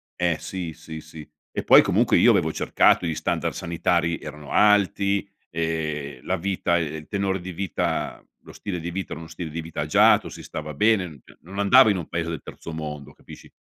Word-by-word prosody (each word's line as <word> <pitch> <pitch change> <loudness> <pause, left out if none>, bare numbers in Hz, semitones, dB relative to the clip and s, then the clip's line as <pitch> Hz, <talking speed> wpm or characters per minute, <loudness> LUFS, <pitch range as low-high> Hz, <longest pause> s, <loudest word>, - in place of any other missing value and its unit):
Eh 85 -2 0
sì, 90 -4 -5
sì, 80 0 -9
sì. 80 -1 -11 0.2
E - - -3
poi - - +8
comunque - - +3
io - - +6
avevo - - +2
cercato 90 - +3
gli 80 -2 -1
standard 80 - -1
sanitari, 85 0 0
erano 75 -2 -9
alti, 100 -1 +3 0.2
ehm, 75 -5 -3
la - - 0
vita 90 -1 0
ehm, 80 -2 -2
il 75 0 -9
tenore 100 -2 -1
di 90 +1 -7
vita 95 -1 -2 0.2
lo - - -13
stile 90 -4 -5
di 85 +2 -5
vita 95 +2 -5
era 80 - -5
uno 80 - -9
stile 85 -1 -6
di 85 +2 -5
vita 80 0 -5
agiato, - - +4
si - - -10
stava 75 0 -6
bene, 105 +3 +3
n 75 -6 -13 0.2
non 95 +4 -8
andavo 120 +5 +7
in 100 - +2
un 85 - -5
paese 85 -1 -2
del 80 -4 -5
terzo 80 - -9
mondo, 75 -2 -6
capisci? - - -14
85 Hz, 200 wpm, -24 LUFS, 80-95 Hz, 0.2 s, poi